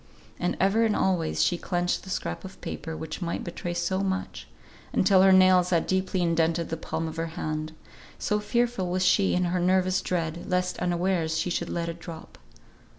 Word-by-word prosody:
And 180 - -1
ever 200 +4 +3
and 220 -2 +2
always 175 -4 +1
she 175 - +1
clenched 175 -1 -1
the 190 - -10
scrap 85 - -3
of 190 - -10
paper 160 +1 -5
which 160 +3 -6
might 170 -1 -3
betray 175 0 -5
so 175 +2 0
much, 190 -1 -3 0.5
until 190 -2 +5
her 190 0 +6
nails 185 -1 +6
had 170 -3 +2
deeply 190 -1 0
indented 165 0 +1
the 165 - -2
palm 160 0 -4
of 160 0 -7
her 165 0 -1
hand; 155 0 -3 0.4
so 210 - 0
fearful 235 -3 0
was 185 +1 0
she 195 +1 +3
in 180 - +2
her 180 +1 0
nervous 185 +1 +2
dread, 170 -2 -3
lest 180 0 0
unawares 175 -2 0
she 170 +2 -1
should - - -2
let 170 -1 -2
it 170 0 -5
drop. 165 -1 -10
180 Hz, 190 wpm, -27 LUFS, 165-190 Hz, 0.5 s, her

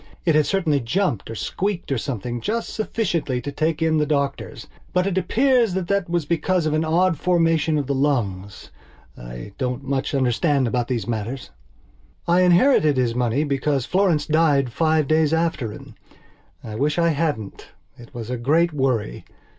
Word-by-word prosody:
It 165 - +3
had 150 -1 +3
certainly 170 -7 +1
jumped 130 - -1
or 115 - -6
squeaked 190 - -3
or 135 - 0
something 120 -1 -4
just 230 - -3
sufficiently 170 - -1
to 145 +3 -5
take 160 +2 -1
in 160 -1 +2
the 150 - +1
doctors, 140 -2 -2 0.3
but 180 0 +2
it 195 -2 -1
appears 230 +3 +2
that 185 -2 -2
that 200 -3 0
was 170 -3 0
because 170 +2 0
of 155 - 0
an 155 +1 +1
odd 165 0 +1
formation 165 -3 +2
of 145 - -1
the 140 - -1
lungs. 105 -9 -2 0.4
I - - -9
don't 125 0 -2
much 135 +1 -2
understand 135 +1 +1
about 120 0 -1
these 125 -3 -2
matters. 120 +3 -4 0.8
I 175 +1 +4
inherited 175 - +4
his 120 -2 +1
money 125 +3 0
because 140 -2 -1
Florence 180 -6 +1
died 150 -5 +2
five 155 +2 +1
days 155 0 +2
after 160 -9 -1
him. - - -11 0.7
I 110 - -7
wish 145 +8 -1
I 170 -1 +3
hadn't. 145 -10 -3 0.3
It 120 -1 -15
was 120 -1 -7
a 125 - -2
great 155 +8 +2
worry. 130 - -1
150 Hz, 170 wpm, -22 LUFS, 125-170 Hz, 0.8 s, I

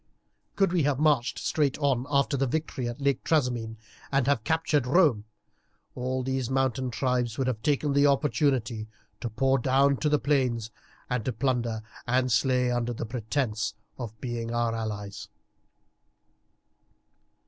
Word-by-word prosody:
Could 195 -3 +2
we 175 - +3
have 145 -2 +1
marched 145 -5 +2
straight 145 -4 0
on 135 -3 0
after 140 0 +2
the 135 0 +1
victory 135 -3 -2
at 120 - -7
Lake 140 -1 0
Trasimene 120 -7 0 0.3
and 135 -2 +2
have 140 -5 +1
captured 155 -3 +1
Rome, 140 - +3 0.7
all 130 +1 -2
these 130 -1 -2
mountain 130 -1 0
tribes 125 -2 -1
would 135 - 0
have 125 -4 -2
taken 145 +2 +1
the 140 +1 +5
opportunity 135 -6 +1 0.3
to 120 - -3
pour 135 +4 +2
down 135 +3 +3
into 145 +2 0
the 150 - +4
plains 125 -7 0 0.4
to 125 0 0
plunder 120 -2 -1 0.2
and 125 +1 +2
slay 125 +1 +2
under 120 0 -1
the 115 - -4
pretence 110 -1 -2 0.2
of 110 -3 -7
being 120 -2 -4
our 120 -1 0
allies." 105 -3 -5
130 Hz, 145 wpm, -27 LUFS, 115-140 Hz, 0.7 s, the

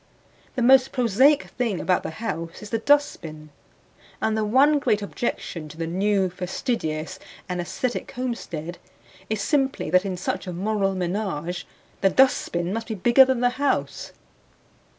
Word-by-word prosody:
The 250 - 0
most 265 +1 +6
prosaic 260 +5 +4
thing 230 -7 -2
about 185 - +1
the - - -5
house 165 -1 -5
is 210 - -9
the 225 - 0
dustbin, 165 - 0 0.7
and 220 - 0
the 220 - 0
one 275 +7 +4
great 210 -6 +1
objection 170 -7 -4
to 155 - -12
the 165 - -2
new 195 +3 +1
fastidious 180 - -3 0.3
and 180 -1 -2
aesthetic 245 +8 -3
homestead 180 - -5 0.5
is 215 -2 -1
simply 270 - 0
that 185 +1 +4
in 190 -2 -3
such 180 - -3
a 180 - -4
moral 195 +1 0
menage 180 -2 -3 0.3
the 195 - +5
dustbin 190 -7 +2
must 225 +1 -4
be 220 - -3
bigger 240 +7 +6
than 260 -2 0
the 245 - +4
house. 285 - -1
205 Hz, 150 wpm, -24 LUFS, 175-250 Hz, 0.7 s, most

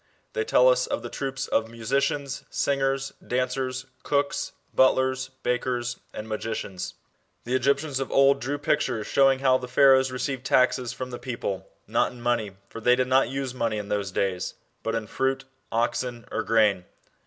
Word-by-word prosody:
They 450 -2 0
tell 450 +3 +5
us - - +4
of - - -2
tLe - - -6
troops 135 -1 -3
of 115 0 +1
musicians, 135 +4 -1
singers, 135 -1 0
dancers, 130 +1 -1 0.2
cooks, 140 0 0 0.2
butlers, 130 0 +3
bakers, 125 0 -1
and 110 - -7
magicians. 110 -4 -4 0.5
The 120 - -3
Egyptians 140 +2 +1
of 135 - -3
old 140 0 +5
drew 140 +4 -2
pictures 125 -6 0
showing 135 -1 +4
how 130 -1 +4
the 125 - -6
Pharaohs 130 +1 +5
received 130 0 -3
taxes 125 -2 +2
from 130 0 -6
the 120 - -6
people, 100 -7 -4 0.2
not - - +1
in 125 - -12
money, 115 -5 -1
for 115 - -9
they 125 +2 +5
did 130 0 0
not 130 0 +4
use 135 -1 -3
money 115 -4 -1
in 105 0 -5
those 100 -1 -1
days, 95 -1 -1 0.3
but 115 0 -2
in 115 -1 -2
fruit, 135 +4 -1 0.3
oxen, 120 +1 -1
or - - 0
grain. 105 -5 +3
130 Hz, 165 wpm, -26 LUFS, 115-135 Hz, 0.5 s, tell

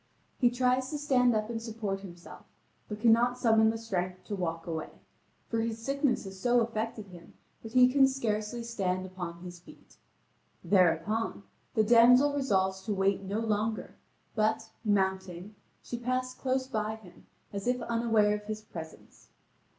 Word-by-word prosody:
He 245 - +5
tries 255 +1 +1
to 300 - -3
stand 255 -5 +3
up 215 0 0
and 225 -1 -4
support 220 -4 -4
himself, 175 -3 -12 0.4
but 210 0 -5
cannot 235 +2 +4
summon 220 -3 +4
the 225 - -1
strength 185 -5 -3
to 205 - -4
walk 165 -3 -3
away, 160 -2 -4 0.6
for 230 - -1
his 225 0 -2
sickness 275 +3 0
has 195 -1 -9
so 245 +4 +3
affected 225 -2 -3
him 175 -2 -14 0.3
that 225 0 -10
he 250 -1 +7
can 270 +1 +5
scarcely 235 -3 -2
stand 185 -5 -2
upon 180 -2 -7
his 175 -1 -9
feet. 175 - -18 0.7
Thereupon, 180 - +1 0.3
the 220 - +4
damsel 245 +5 +6
resolves 190 -9 0
to 210 - -1
wait 195 +1 +1
no 200 +3 -3
longer, 215 0 -2 0.4
but, 220 0 0
mounting, 190 -2 -1 0.3
she 240 - -5
passed 255 +1 -2
close 260 0 0
by 220 -4 -2
him, 190 -6 -17 0.3
as 200 +2 -4
if 250 0 +1
unaware 225 -3 +2
of 210 0 -4
his 215 0 -5
presence. 160 -5 -11
220 Hz, 160 wpm, -30 LUFS, 190-240 Hz, 0.7 s, he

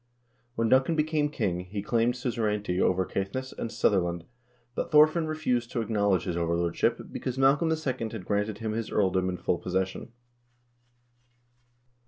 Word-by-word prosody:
When 115 -2 +1
Duncan 130 +7 +3
became 150 -1 +1
king, 90 -11 -1
he 100 +2 -5
claimed 115 +3 +1
suzerainty 105 -6 -1
over 95 0 +2
Caithness 115 +10 -4
and 115 - -4
Sutherland, 85 -6 +1 0.5
but - - -3
Thorfinn 155 +2 +5
refused 125 -7 -1
to 120 - 0
acknowledge 100 -5 +1
his 90 -3 -3
overlordship, 85 0 0
because 130 0 -4
Malcolm 140 +5 +4
II. 130 -8 -2
had 90 - -7
granted 105 +1 -1
him 110 0 -3
this 115 0 -3
earldom 95 -2 +1
in 90 - -3
full 85 0 -1
posses 95 +1 0
sion. 95 - -9
110 Hz, 150 wpm, -28 LUFS, 95-130 Hz, 0.5 s, Thorfinn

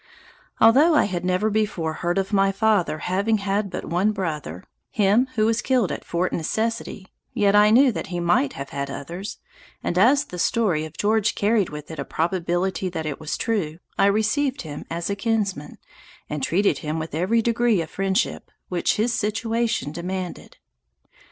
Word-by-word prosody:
Although 280 +9 +6
I - - +5
had 180 -3 -3
never 185 +4 +1
before 200 -7 -1
heard 175 +1 0
of 195 +2 -1
my 195 0 +4
father 200 -5 +1
having 200 +5 +1
had 200 0 -1
but - - -5
one 190 +5 +1
brother, 150 - -4 0.3
(him 215 +5 +3
who 215 -1 +2
was 225 +1 +1
killed 255 -7 +1
at - - -5
Fort 175 +2 -1
Necessity,) 220 +3 -2 0.3
yet 205 -3 +3
I 210 0 +6
knew 255 +4 +6
that - - -5
he 175 -1 -4
might 170 -5 +2
have 140 0 -7
had 140 0 -4
others, 170 +9 -6 0.5
and, 175 - 0
as 275 +8 +5
the 180 - -8
story 180 -7 +1
of 155 - -11
George 215 0 +1
carried 210 -1 +2
with 150 +1 -8
it 160 - -7
a - - -1
probability 175 +4 -1
that 165 -3 -4
it 145 -2 -4
was 155 0 -4
true, 180 -9 -1 0.2
I 195 - +4
received 235 +6 +1
him 150 -2 -7
as 170 +1 -3
a - - -1
kinsman, 200 -8 -2 0.5
and 150 -1 -4
treated 195 +9 +1
him 155 -1 -3
with 160 -1 -5
every 195 +9 +1
degree 235 -3 +2
of 160 -1 -4
friendship 195 0 -1 0.2
which 180 -2 +1
his 225 +3 +1
situation 225 - -1
demanded. 180 +2 -6
195 Hz, 175 wpm, -23 LUFS, 170-220 Hz, 0.5 s, Although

